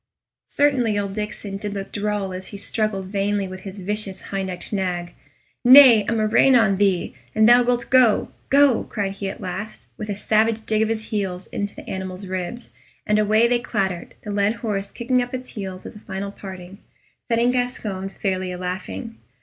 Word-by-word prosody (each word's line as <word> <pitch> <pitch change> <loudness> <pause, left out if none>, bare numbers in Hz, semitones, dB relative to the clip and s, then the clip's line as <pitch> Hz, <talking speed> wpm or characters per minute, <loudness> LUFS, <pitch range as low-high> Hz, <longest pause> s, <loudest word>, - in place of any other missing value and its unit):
Certainly 255 -7 +2
old 200 -1 -2
Diccon 210 -1 -5
did 205 0 -4
look 195 -1 -5
droll 205 -2 -2
as 185 +1 -7
he 200 - -8
struggled 205 -1 -2
vainly 200 0 -1
with 185 0 -8
his 195 0 -8
vicious 205 0 -2
high 195 0 -1
necked 185 +1 -5
nag. 180 -3 -2 0.5
"Nay, 250 -4 +9
a - - 0
murrain 225 +4 +4
on 215 -5 +4
thee! 195 -3 +1 0.2
an' 220 - +5
thou 240 +2 +7
wilt 245 0 0
go, 250 -5 +4 0.2
go!" 280 -3 +5
cried 200 -2 -3
he 195 0 -4
at - - -8
last, 210 +4 -6
with 215 -1 -6
a 205 - -1
savage 220 +2 +1
dig 215 0 +1
of 220 - +1
his 220 -1 -3
heels 190 -4 -2
into 205 0 -4
the - - -11
animal's 190 0 -5
ribs, 185 +6 -5 0.3
and 210 0 +2
away 215 +2 +4
they 240 0 +2
clattered, 190 -7 -3
the 210 - -5
led 205 +2 +1
horse 200 -2 -2
kicking 250 +1 0
up 245 +1 -4
its 255 0 -7
heels 190 -3 -7
as - - -9
a - - -10
final 195 0 -5
parting, 190 -1 -10 0.5
setting 235 +1 +2
Gascoyne 220 -6 -2
fairly 185 -1 -2
alaughing. 185 +6 -5
205 Hz, 185 wpm, -22 LUFS, 190-225 Hz, 0.5 s, Nay